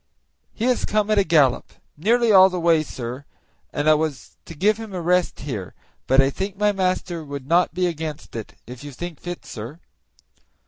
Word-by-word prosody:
"He 230 - -3
has 255 -1 +1
come 215 0 0
at 210 - +4
a - - +4
gallop 150 -7 +2 0.2
nearly 230 +8 +2
all 190 -1 +8
the 180 -1 -3
way, 165 -2 +4
sir, 130 -2 -6 0.5
and 145 - -2
I 155 - +7
was 155 -3 -3
to 165 - -10
give 205 +7 +2
him 220 -3 -8
a - - -2
rest 180 +1 +1
here; 110 -10 -6 0.3
but 135 +1 +4
I 135 0 +4
think 195 +5 -4
my 210 0 +3
master 185 -3 -1
would 140 -2 -7
not 170 +3 +2
be 180 0 +1
against 160 -5 -5
it, 110 -2 -7
if 125 +2 -10
you 145 -1 -8
think 175 +2 -7
fit, 175 0 -7
sir." 120 +9 -8
165 Hz, 195 wpm, -22 LUFS, 145-190 Hz, 0.5 s, all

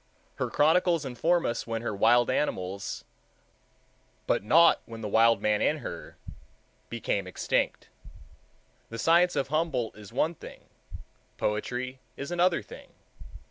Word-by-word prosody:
Her - - -2
chronicles 165 0 +3
inform 165 +7 +1
us 120 - -2
when 115 0 -3
her 115 - -2
wild 120 +4 +4
animals, 100 -8 -2 1.2
but - - +1
not 165 +10 +5
when 115 -1 -9
the 105 - -3
wild 115 +2 +4
man 105 -1 +2
in - - +2
her, - - -8 0.7
became 100 -4 -2
extinct. 95 - -1 1.0
The 115 - -7
science 170 +7 +3
of 135 - -1
Humboldt 150 -7 -1
is 105 -1 -12
one 155 +7 0
thing, - - -12 0.8
poetry 125 +5 -2 0.2
is 140 +4 -6
another 175 0 +2
thing. - - -13
125 Hz, 130 wpm, -28 LUFS, 115-165 Hz, 1.2 s, not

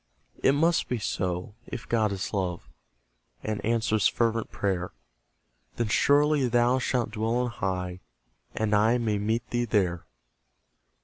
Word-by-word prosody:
It 135 - +4
must 165 +4 +2
be 125 - 0
so, 90 -2 -2
if 125 - -7
God 110 -3 +1
is 95 +2 -4
love, 90 -3 -2 0.8
And 110 -1 -3
answers 110 -2 +2
fervent 115 -1 0
prayer; 95 -3 -1 0.9
Then 115 -2 -1
surely 145 +2 +3
thou 120 +2 +3
shalt 125 -3 -1
dwell 110 +2 -1
on 125 0 0
high, 90 -4 -3 0.6
And 110 -1 0
I 110 +4 +4
may 110 -4 0
meet 110 +3 -1
thee 120 0 +1
there. 90 -6 0
110 Hz, 135 wpm, -27 LUFS, 100-120 Hz, 0.9 s, It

